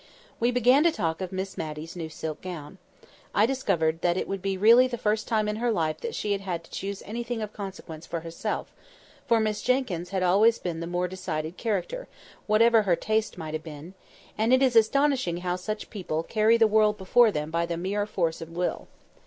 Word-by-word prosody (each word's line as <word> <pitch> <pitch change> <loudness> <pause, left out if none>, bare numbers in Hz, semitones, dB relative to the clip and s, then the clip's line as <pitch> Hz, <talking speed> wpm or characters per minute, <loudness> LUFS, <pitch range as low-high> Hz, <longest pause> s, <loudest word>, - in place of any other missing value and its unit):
We 235 - +2
began 250 +4 +4
to 340 - +5
talk 165 - -2
of 185 - -4
Miss 190 0 -4
Matty's 155 +1 -6
new 165 -2 -5
silk 155 -1 -6
gown. 180 -1 -8 0.6
I 210 - +5
discovered 175 -11 0
that 175 0 +1
it - - -2
would 195 -1 -4
be 195 0 -1
really 230 +6 +7
the 245 -1 -4
first 215 0 0
time 215 -2 +1
in 210 0 -2
her 240 +1 0
life 160 -7 -1
that 465 -1 -4
she 210 - -2
had 200 -1 0
had 175 -4 -4
to - - -19
choose 195 0 -5
anything 235 +2 -4
of 215 -1 -5
consequence 185 -5 -8
for 170 -1 -4
herself: 165 0 -4 0.5
for 230 -1 +4
Miss 215 -1 -1
Jenkyns 235 -10 0
had 190 -1 -1
always 210 +6 +4
been 170 -2 -4
the 170 - -4
more 175 +1 -1
decided 170 -3 -4
character, 230 - -3 0.4
whatever 225 +1 +5
her 190 -4 +2
taste 220 +3 -1
might 160 -2 -6
have 155 - -2
been; 155 +3 -9 0.5
and 225 +2 +2
it 260 +1 +5
is 255 -3 +3
astonishing 255 -4 +3
how 180 0 -2
such 210 +4 -5
people 170 -7 -3
carry 220 +4 +3
the 230 - +5
world 215 -1 +3
before 225 +5 +4
them 150 -3 -3
by 170 +1 0
the 170 -1 -3
mere 200 +4 -1
force 170 -5 -1
of 165 - -7
will. 175 +2 -3
195 Hz, 210 wpm, -27 LUFS, 170-225 Hz, 0.6 s, really